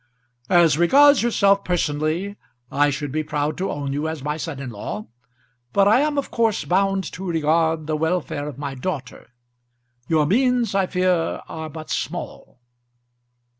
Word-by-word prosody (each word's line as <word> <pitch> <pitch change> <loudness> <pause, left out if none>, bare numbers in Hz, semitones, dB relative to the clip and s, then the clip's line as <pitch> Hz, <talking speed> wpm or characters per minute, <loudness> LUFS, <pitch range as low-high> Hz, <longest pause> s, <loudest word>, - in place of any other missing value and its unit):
"As 170 -4 +4
regards 280 +11 +6
yourself 200 -4 +3
personally 165 +3 -1 0.4
I 145 +1 +3
should 145 0 -3
be 155 +2 -1
proud 150 0 -2
to 190 - -1
own 140 -1 -3
you 145 +3 -2
as 160 -4 -5
my 150 +1 -1
son 150 -2 -5
in 135 -3 -6
law, 105 -1 -6 0.7
but 200 0 +4
I 215 +5 +5
am 295 0 0
of 280 - -2
course 225 -3 +1
bound 195 +1 +1
to 185 - -8
regard 160 -2 +1
the 155 0 -1
welfare 160 -2 -1
of 145 -4 -7
my 140 -1 -4
daughter. 135 -1 -6 0.8
Your 155 -2 +2
means 245 - +2
I 195 -1 +2
fear 180 -3 0
are 160 -1 -6
but 155 0 -9
small." 125 - -5
160 Hz, 160 wpm, -22 LUFS, 145-195 Hz, 0.8 s, regards